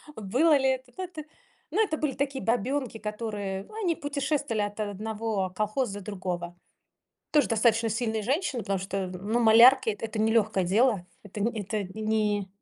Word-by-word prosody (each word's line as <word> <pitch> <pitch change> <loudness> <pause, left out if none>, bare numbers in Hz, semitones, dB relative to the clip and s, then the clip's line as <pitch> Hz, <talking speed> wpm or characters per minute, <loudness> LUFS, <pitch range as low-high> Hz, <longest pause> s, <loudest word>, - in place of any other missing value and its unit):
было 265 +10 +3
ли 265 -1 +2
это 260 -1 -2
да, 375 - -3
это. 320 -4 -7 0.5
Ну, 440 - +2
это 315 -7 -1
были 295 -4 -1
такие 275 0 -2
бабёнки, 245 +2 -1
которые, 210 -3 -4
ну, 425 - -15
они 340 -4 +1
путешествовали 280 -5 -1
от 205 +1 -3
о 210 -1 -1
одного 215 -1 -2
колхоза 215 0 -1
до 195 - -13
другого. 180 -4 -4 0.8
Тоже 300 -1 +4
достаточно 225 0 +2
сильные 220 0 -1
женщины, 265 - -1
потому 195 -2 -1
что, 190 0 -3
ну, 200 +6 -2
малярки- 235 +2 +7
эт 210 - -7
это 225 -1 -4
не 220 +1 +2
лёгкое 215 -4 +2
дело. 205 0 +2 0.2
Эт 205 -1 -14
это 215 -1 -1
ни 215 -2 0
220 Hz, 170 wpm, -27 LUFS, 205-260 Hz, 0.8 s, малярки